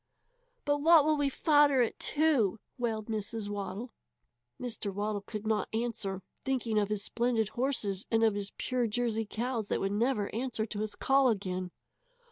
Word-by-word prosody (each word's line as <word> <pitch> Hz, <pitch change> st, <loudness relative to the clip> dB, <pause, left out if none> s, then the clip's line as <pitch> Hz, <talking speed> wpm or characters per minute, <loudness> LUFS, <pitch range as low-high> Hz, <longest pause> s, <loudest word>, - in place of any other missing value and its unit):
"But 290 Hz, 0 st, +2 dB
what 325 Hz, -1 st, +7 dB
will 310 Hz, 0 st, +3 dB
we 290 Hz, -1 st, +1 dB
fodder 290 Hz, -2 st, +4 dB
it 230 Hz, -, -3 dB
to?" 290 Hz, -10 st, +2 dB, 0.2 s
wailed 225 Hz, -3 st, -1 dB
Mrs. 215 Hz, -1 st, -3 dB
Waddle. 205 Hz, +3 st, -5 dB, 0.7 s
Mr. 230 Hz, -4 st, -4 dB
Waddle 205 Hz, +1 st, -2 dB
could 210 Hz, +1 st, -7 dB
not 215 Hz, -1 st, 0 dB
answer, 220 Hz, -5 st, -2 dB, 0.2 s
thinking 245 Hz, -5 st, 0 dB
of 205 Hz, -1 st, 0 dB
his 210 Hz, -1 st, -1 dB
splendid 235 Hz, -3 st, 0 dB
horses, 215 Hz, -6 st, -1 dB
and 225 Hz, 0 st, +2 dB
of 220 Hz, -2 st, +4 dB
his 200 Hz, 0 st, -3 dB
pure 250 Hz, -2 st, 0 dB
Jersey 225 Hz, -1 st, -1 dB
cows 235 Hz, -2 st, -2 dB
that -, -, 0 dB
would 195 Hz, -, -1 dB
never 215 Hz, -1 st, 0 dB
answer 230 Hz, -1 st, -1 dB
to 210 Hz, -2 st, -6 dB
his 215 Hz, 0 st, -3 dB
call 270 Hz, -1 st, +4 dB
again. 185 Hz, -4 st, -2 dB
225 Hz, 165 wpm, -31 LUFS, 205-255 Hz, 0.7 s, what